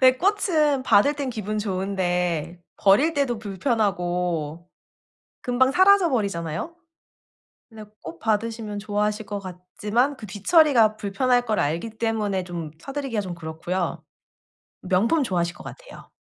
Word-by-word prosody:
근데 255 -1 +6
꽃은 325 -8 +2
받을 245 +4 +4
땐 280 -3 -3
기분 215 -2 -4
좋은데 180 -4 -1 0.2
버릴 245 +12 +4
때도 270 -5 0
불편하고 180 - -1 0.8
금방 255 +1 +2
사라져 380 0 +5
버리잖아요. 200 - -2 1.0
근데 220 -1 -10 0.2
꽃 165 +1 -8
받으시면 220 0 -2
좋아하실 210 +1 -1
것 205 - -4
같지만 205 +8 -2
그 215 - -9
뒤처리가 225 - +4
불편할 245 +4 +1
걸 215 -2 +1
알기 165 +10 -1
때문에 210 -5 -1
좀 170 -4 -6
사드리기가 275 -4 -3
좀 185 -3 -6
그렇고요. 170 +1 -4 0.8
명품 205 - +2
좋아하실 175 -7 -1
것 - - -12
같아요. - - -12
210 Hz, 295 characters per minute, -24 LUFS, 180-255 Hz, 1.0 s, 근데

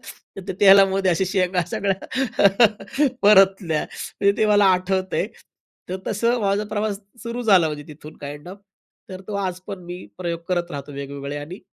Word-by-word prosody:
तर - - -13
त्या 190 - -4
तेलामध्ये 195 -1 +6
अशा 175 +3 +1
शेंगा 185 -1 +1
सगळ्या 200 +2 +2 0.6
परतल्या. 195 -5 +4
म्हणजे 200 0 -1
ते 215 - +3
मला 205 -1 +4
आठवतंय 185 +1 -1 0.6
तर 185 - -3
तसं 235 +4 0
माझा 200 0 0
प्रवास 210 -1 -2 0.2
सुरू 235 +1 -4
झाला 190 -7 +5
म्हणजे 150 -1 -6
तिथून 150 +1 -12
काइंड 145 +3 -8
ऑफ. 190 +2 -10 0.5
तर 185 0 -8
तो 210 - -4
आज 185 0 -5
पण 200 -2 -6
मी 180 - -6 0.2
प्रयोग 170 -2 -3
करत 175 -1 -1
राहतो 145 -1 -7
वेगवेगळे 140 +1 -6
आणि 160 +6 -8
190 Hz, 160 wpm, -22 LUFS, 170-200 Hz, 0.6 s, तेलामध्ये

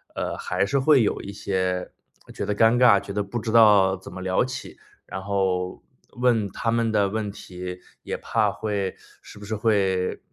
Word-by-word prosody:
呃， - - -3
还 90 +2 -1
是 140 +6 0
会 135 -3 +5
有 - - -1
一 100 - -7
些， 95 -2 -2 0.4
觉 - - -4
得 105 0 -1
尴 115 +2 +4
尬， 120 -5 +6
觉 100 0 -8
得 105 - 0
不 110 +4 -4
知 110 +1 -4
道 105 -4 +6
怎 95 - -12
么 95 +1 -8
聊 95 +4 +1
起， 130 0 -7 0.3
然 95 - -6
后 95 -2 -1 0.3
问 120 -5 +1
他 115 +1 -2
们 115 -1 +1
的 100 -2 +2
问 105 -1 -3
题， 90 -2 -8 0.2
也 - - -4
怕 - - 0
会 100 -3 -3 0.3
是 - - -14
不 105 - -10
是 110 +1 -3
会 100 -4 +1
100 Hz, 205 characters per minute, -24 LUFS, 95-110 Hz, 0.4 s, 尬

